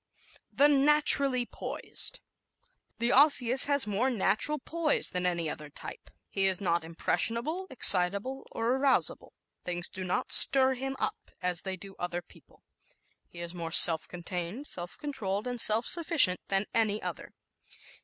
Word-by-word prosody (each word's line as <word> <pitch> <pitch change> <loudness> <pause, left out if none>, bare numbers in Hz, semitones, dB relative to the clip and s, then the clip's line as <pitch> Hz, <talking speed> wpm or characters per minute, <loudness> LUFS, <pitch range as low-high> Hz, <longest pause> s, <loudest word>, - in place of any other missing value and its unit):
The 290 - +3
Naturally 280 -3 +3
Poised - - -6 0.4
¶ - - -31 0.3
The 235 0 -1
Osseous 265 -3 +4
has 285 -1 0
more 210 +5 -1
natural 250 +5 0
poise 315 +2 -2
than 180 0 -2
any 170 -2 -2
other 150 -1 -7
type. 145 - -10 0.2
He 195 -1 0
is 190 -2 +2
not 170 -3 -1
impressionable, 235 - -3
excitable 200 +3 +2
or 230 +1 -2
arousable. 265 -1 -1 0.3
Things 175 0 -4
do 185 - -8
not 180 0 -3
"stir 265 -1 +5
him 270 +1 -6
up" - - -5
as 180 -1 -1
they 190 -1 -6
do 195 +1 -12
other 175 0 -5
people. - - -23 0.6
He 170 - -12
is 170 0 -7
more 165 -2 -7
self 160 -2 +7
contained, 175 +7 -7
self 175 -9 -5
controlled 210 -8 -5
and 245 -1 0
self 220 +2 +4
sufficient 320 - +2
than 195 +1 -1
any 215 -2 0
other. - - -8
210 Hz, 150 wpm, -28 LUFS, 180-270 Hz, 0.6 s, self